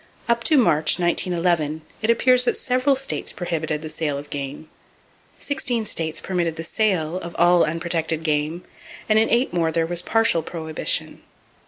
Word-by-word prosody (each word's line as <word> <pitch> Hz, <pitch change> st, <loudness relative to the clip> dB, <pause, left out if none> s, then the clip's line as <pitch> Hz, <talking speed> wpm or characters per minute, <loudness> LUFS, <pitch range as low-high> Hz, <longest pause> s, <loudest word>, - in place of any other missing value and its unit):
Up 235 Hz, 0 st, +1 dB
to 310 Hz, -, +5 dB
March, 155 Hz, -, +3 dB
1911, 170 Hz, -3 st, 0 dB, 0.2 s
it 220 Hz, -, -1 dB
appears 250 Hz, +2 st, +4 dB
that -, -, +1 dB
several 255 Hz, +2 st, +1 dB
states 270 Hz, +1 st, -3 dB
prohibited 160 Hz, -3 st, -3 dB
the -, -, -5 dB
sale 150 Hz, -2 st, -2 dB
of 145 Hz, +1 st, -9 dB
game, 140 Hz, +2 st, -6 dB, 0.7 s
sixteen 250 Hz, -5 st, -1 dB
states 160 Hz, -5 st, -1 dB
permitted 175 Hz, -3 st, -2 dB
the 165 Hz, -, -6 dB
sale 180 Hz, -3 st, 0 dB
of 170 Hz, -2 st, -7 dB
all 175 Hz, 0 st, +5 dB
unprotected 165 Hz, 0 st, -1 dB
game, 155 Hz, +2 st, -1 dB, 0.4 s
and 215 Hz, 0 st, +4 dB
in 220 Hz, -, +2 dB
eight 240 Hz, -2 st, +1 dB
more 165 Hz, -2 st, +1 dB
there 165 Hz, 0 st, +1 dB
was 175 Hz, +1 st, -1 dB
partial 225 Hz, -6 st, +2 dB
prohibition. 160 Hz, -1 st, -3 dB
170 Hz, 160 wpm, -22 LUFS, 160-220 Hz, 0.7 s, to